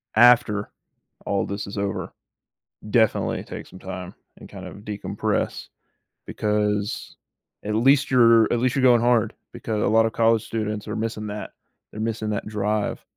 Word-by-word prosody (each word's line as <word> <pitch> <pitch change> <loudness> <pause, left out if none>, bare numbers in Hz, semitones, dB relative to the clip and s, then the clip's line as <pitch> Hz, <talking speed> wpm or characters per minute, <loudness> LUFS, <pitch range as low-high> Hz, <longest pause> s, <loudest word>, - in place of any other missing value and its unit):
After 110 -3 +5 0.5
all 100 -1 0
this 100 +1 -5
is 100 - -7
over, 100 -1 -3 0.8
definitely 110 -1 +2
take - - -8
some 95 - -13
time 95 -1 -7 0.2
and - - -12
kind - - -9
of - - -9
decompress, 105 0 -3 0.6
because 105 -1 -1 0.5
at 105 +1 -1
least 135 +5 +4
you're 115 -3 +6
at 120 - 0
least 130 +1 +1
you're 135 - +1
going 125 -2 +5
hard, 120 -2 +2 0.2
because 110 -2 -3
a - - +2
lot 110 +2 +4
of 115 - -2
college 115 -1 +2
students 105 -2 -3
are 105 - -4
missing 110 -1 -3
that. 105 0 -6 0.4
They're 105 - -9
missing 110 -1 -2
that 105 0 -3
drive, 105 0 -2
110 Hz, 160 wpm, -24 LUFS, 105-115 Hz, 0.8 s, you're